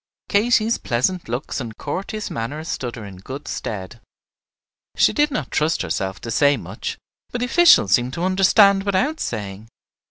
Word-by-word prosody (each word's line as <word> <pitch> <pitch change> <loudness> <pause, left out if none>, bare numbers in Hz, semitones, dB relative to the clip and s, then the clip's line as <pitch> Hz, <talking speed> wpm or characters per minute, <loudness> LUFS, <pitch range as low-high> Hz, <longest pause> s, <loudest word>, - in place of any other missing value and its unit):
Katy's 225 +2 +2
pleasant 130 +7 -1
looks 125 +5 -3
and 115 -4 -7
courteous 195 +8 -4
manner 130 +7 -4
stood 125 -6 -4
her 115 - -8
in 95 -2 -10
good 130 +10 -8
stead. 105 +2 -6 0.9
She - - +4
did 295 0 +2
not 275 - -4
trust 155 +2 +1
herself 95 0 -3
to 115 - -5
say 145 +4 +3
much; - - -6 0.3
but - - -4
the 245 - -1
officials 290 - +5
seemed 120 +5 +2
to 170 - -3
understand 195 +1 +5
without 205 +11 0
saying. 105 -1 -5
145 Hz, 160 wpm, -21 LUFS, -, 0.9 s, officials